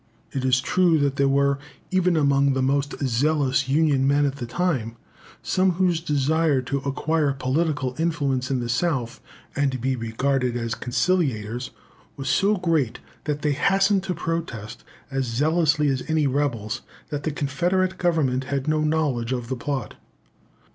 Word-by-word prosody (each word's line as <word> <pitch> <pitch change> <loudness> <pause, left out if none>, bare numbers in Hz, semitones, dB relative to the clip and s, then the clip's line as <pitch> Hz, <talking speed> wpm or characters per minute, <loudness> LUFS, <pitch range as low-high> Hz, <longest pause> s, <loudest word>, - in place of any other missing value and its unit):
It 135 - -3
is 130 0 +3
true 175 +2 +3
that 140 -2 0
there 140 - +3
were, 140 0 +2 0.3
even 180 -2 +2
among 140 -2 +3
the 130 0 0
most 140 +2 0
zealous 135 +1 +1
Union 140 -2 +3
men 145 +1 +3
at 140 0 -2
this 120 -4 -6
time, 130 -10 -1 0.5
some 185 0 +2
whose 175 -2 +1
desire 150 -1 +1
to 140 +3 -2
acquire 145 +2 0
political 135 0 -1
influence 140 -6 0
in 130 -2 0
the 120 - -3
South, 125 -2 -1 0.3
and 135 -2 0
be 130 +2 0
regarded 125 +2 -1
as 115 -1 -2
conciliators, 125 - -1 0.5
was 135 -1 -3
so 200 +10 +3
great, 165 -9 0 0.3
that 145 -1 -2
they 150 - +2
hastened 195 +7 +2
to 185 -2 -2
protest, 125 -10 -4 0.3
as 135 -1 -1
zealously 150 +5 +2
as 130 -2 0
any 160 -2 +2
rebels, 130 -6 -1 0.3
that 145 -2 -3
the 155 - -1
Confederate 175 +7 0
Government 145 -7 +1
had 140 0 -2
no 155 0 +2
knowledge 150 -6 0
of 120 -2 -3
the 130 - -1
plot. 130 -2 -4
140 Hz, 155 wpm, -24 LUFS, 130-160 Hz, 0.5 s, is